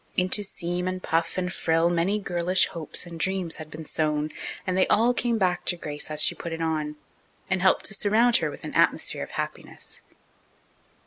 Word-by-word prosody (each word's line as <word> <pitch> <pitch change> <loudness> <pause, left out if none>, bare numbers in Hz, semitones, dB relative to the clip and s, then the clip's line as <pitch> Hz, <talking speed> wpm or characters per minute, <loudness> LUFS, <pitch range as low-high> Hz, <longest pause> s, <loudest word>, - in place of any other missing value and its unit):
Into 185 +3 +3
seam 180 -2 -2
and 185 0 -3
puff 165 +2 0
and 180 0 -1
frill 165 +1 +2
many 175 +4 +1
girlish 180 -2 +2
hopes 165 +1 -5
and 170 -1 -9
dreams 185 -2 0
had 155 -1 -8
been 155 +1 -8
sewn, 150 0 0 0.3
and 185 - -1
they 185 - +3
all 235 +3 +4
came 240 -1 0
back 180 -4 +1
to 175 - 0
Grace 150 -2 -2
as 155 -1 +4
she - - +5
put 170 - -6
it 165 - -5
on, 155 -2 -1 0.6
and 190 -1 +1
helped 190 0 +3
to - - +1
surround 225 +4 +4
her - - -1
with - - -7
an - - -6
atmosphere - - +2
of - - -5
happiness. - - -5
175 Hz, 195 wpm, -26 LUFS, 160-190 Hz, 0.6 s, she